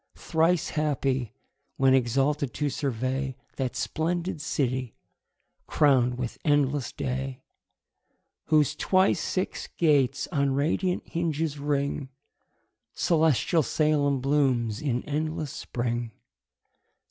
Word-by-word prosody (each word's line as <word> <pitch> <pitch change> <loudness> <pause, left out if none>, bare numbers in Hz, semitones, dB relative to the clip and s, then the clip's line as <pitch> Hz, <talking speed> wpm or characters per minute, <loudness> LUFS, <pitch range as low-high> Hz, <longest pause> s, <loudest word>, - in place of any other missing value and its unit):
Thrice 165 0 +1
happy, 135 -5 -1 0.4
when 135 -1 +4
exalted 135 +2 +1
to 145 -1 -1
survey 130 0 -2 0.2
That 130 -2 -2
splendid 170 0 -2
city, 130 -5 -1 0.7
crown'd 125 -4 +3
with 125 -2 -4
endless 145 -2 +1
day, 135 -1 -4 1.0
Whose 150 -2 +3
twice 185 +4 +2
six 185 - -2
gates 140 -5 +3
on 140 -4 +1
radiant 180 +6 0
hinges 160 -3 -2
ring: 140 -1 -1 0.9
Celestial 160 -1 +2
Salem 145 -2 +1
blooms 130 -6 +1
in 125 -5 -1
endless 155 -1 -2
spring. 120 -1 -3
140 Hz, 95 wpm, -27 LUFS, 130-155 Hz, 1.0 s, when